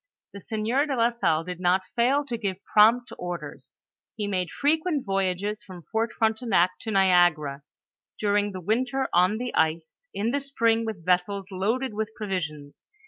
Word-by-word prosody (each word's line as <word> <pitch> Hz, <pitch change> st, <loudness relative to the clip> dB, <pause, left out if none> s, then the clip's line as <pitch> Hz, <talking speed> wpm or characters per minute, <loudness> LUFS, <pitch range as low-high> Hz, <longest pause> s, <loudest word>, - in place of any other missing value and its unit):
The 200 Hz, -, -8 dB
sieur 225 Hz, +8 st, -1 dB
de 275 Hz, -, -1 dB
la 235 Hz, 0 st, +3 dB
Salle 165 Hz, -9 st, +1 dB
did 180 Hz, 0 st, -6 dB
not 185 Hz, +1 st, +2 dB
fail 265 Hz, +5 st, +2 dB
to 245 Hz, -4 st, -3 dB
give 200 Hz, -5 st, -3 dB, 0.2 s
prompt 230 Hz, +4 st, +5 dB
orders; 175 Hz, -1 st, -7 dB, 0.4 s
he 210 Hz, -, -3 dB
made 185 Hz, -3 st, -1 dB
frequent 310 Hz, 0 st, 0 dB
voyages 195 Hz, +1 st, -1 dB
from 180 Hz, -3 st, -11 dB
Fort 225 Hz, +1 st, 0 dB
Frontenac 220 Hz, -6 st, +2 dB
to 225 Hz, -, -6 dB
Niagara, 175 Hz, -8 st, +3 dB, 0.6 s
during 205 Hz, 0 st, +1 dB
the 185 Hz, -1 st, -7 dB
winter 250 Hz, +7 st, 0 dB
on 180 Hz, +4 st, +4 dB
the 245 Hz, +1 st, -4 dB
ice, 160 Hz, -, -1 dB
in 205 Hz, +4 st, -1 dB
the 285 Hz, -, 0 dB
spring 230 Hz, -5 st, +1 dB
with 195 Hz, -7 st, -6 dB
vessels 190 Hz, +2 st, 0 dB
loaded 220 Hz, +7 st, -1 dB
with 215 Hz, +1 st, -2 dB
provisions. 155 Hz, -9 st, -5 dB
205 Hz, 160 wpm, -26 LUFS, 180-235 Hz, 0.6 s, prompt